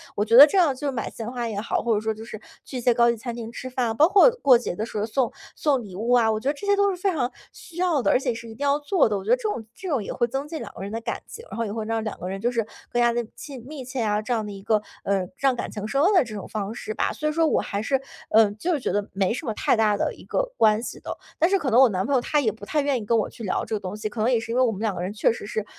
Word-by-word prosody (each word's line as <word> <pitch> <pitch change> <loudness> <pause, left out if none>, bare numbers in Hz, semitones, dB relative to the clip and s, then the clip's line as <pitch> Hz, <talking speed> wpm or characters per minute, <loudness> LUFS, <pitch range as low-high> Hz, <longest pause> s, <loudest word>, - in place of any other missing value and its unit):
我 205 - +1
觉 225 +2 +3
得 275 +4 +12
这 350 - 0
样 325 -7 +4
就 280 +2 -2
买 255 - -3
鲜 225 0 -6
花 240 -2 -3
也 210 -3 -3
好， 215 - -1
或 235 -2 +1
者 210 - 0
说 220 0 -1
就 220 +1 -10
是 220 -2 -8 0.3
去 260 - -6
一 245 - -3
些 240 0 +4
高 235 0 +4
级 235 - 0
餐 240 +1 -5
厅 230 -1 -6
吃 255 +2 -7
饭， 245 -3 -1
包 305 +6 +6
括 405 +5 +7
过 260 -3 +7
节 235 -6 -4
的 215 - -2
时 220 - -7
候 210 - 0
送 245 +2 0 0.2
送 280 -5 +1
礼 195 -4 -10
物 230 +5 -2
啊， 230 -3 +5
我 215 - -1
觉 265 +5 -1
得 - - +1
这 305 - -9
些 405 - +4
都 400 0 +3
是 - - -6
非 390 -1 +2
常 255 -6 -1 0.2
需 340 - -14
要 350 -6 +2
的， - - +2
而 - - +4
且 260 -2 -1
是 230 +1 -8
一 220 - -10
定 280 - -5
要 280 0 +3
做 300 +1 +2
的。 210 -2 -1
我 190 - -6
觉 - - -6
得 - - +6
这 - - -13
种 415 - -2
这 380 - -8
种 270 -9 0
也 - - -5
会 240 - +1
增 270 +4 -4
进 315 +1 -5
两 205 -3 -8
个 - - -10
人 200 - -5
的 225 - -3
感 - - -4
情， 460 - -10
然 - - -6
后 230 - -1
也 205 - -4
会 220 0 -4
让 225 0 -1
两 215 - -5
个 180 - -5
人 195 +1 -4
就 240 +2 +1
是 230 -3 0 0.3
更 240 - +1
加 240 0 +4
地 240 0 -1
亲 270 -5 -9
密 295 -3 -7
切 255 0 -4
啊， 210 -1 +1
这 220 +3 -2
样 220 -2 -1
的 210 - -6
一 195 -1 -9
个， 215 0 +2 0.2
呃， 195 -2 0
让 270 -2 +2
感 - - -4
情 210 0 -5
升 275 +5 +1
温 390 +5 +4
的 360 -7 +5
这 230 - -9
种 200 - -6
方 210 0 -4
式 215 -2 -5
吧。 - - 0
所 305 - -3
以 - - 0
说 325 +1 +2
我 - - +2
还 200 +1 -3
是， 270 +4 0 0.3
呃， 220 -1 +5
就 335 +12 -1
是 295 - 0
觉 - - -2
得 205 0 -1
没 195 +1 +1
什 300 - -5
么 225 - -1
太 - - +2
大 215 -2 +3
的 - - -1
一 - - -14
个 - - -1
关 215 0 +4
系 - - -6
的。 - - -6 0.2
但 335 +3 +4
是 390 - +3
可 295 -6 -1
能 240 +1 +5
我 265 -2 +7
男 190 -1 -1
朋 280 - -1
友 255 - +3
他 295 +4 +1
也 225 -5 +1
不 210 -2 -11
太 300 +6 0
愿 280 -2 +1
意 215 - -6
跟 230 +1 +2
我 215 - 0
去 230 - -11
聊 190 - -1
这 220 - -2
个 - - -2
东 185 0 -6
西， 215 0 -3
可 220 - -8
能 235 +4 +2
也 240 - +3
是 225 0 -6
因 240 - -1
为 255 - +5
我 240 - +2
们 200 -1 -6
两 215 -4 0
个 - - -4
人 185 +3 -3
确 215 - +2
实 225 - -6
是， 210 0 -3
235 Hz, 385 characters per minute, -24 LUFS, 215-275 Hz, 0.3 s, 得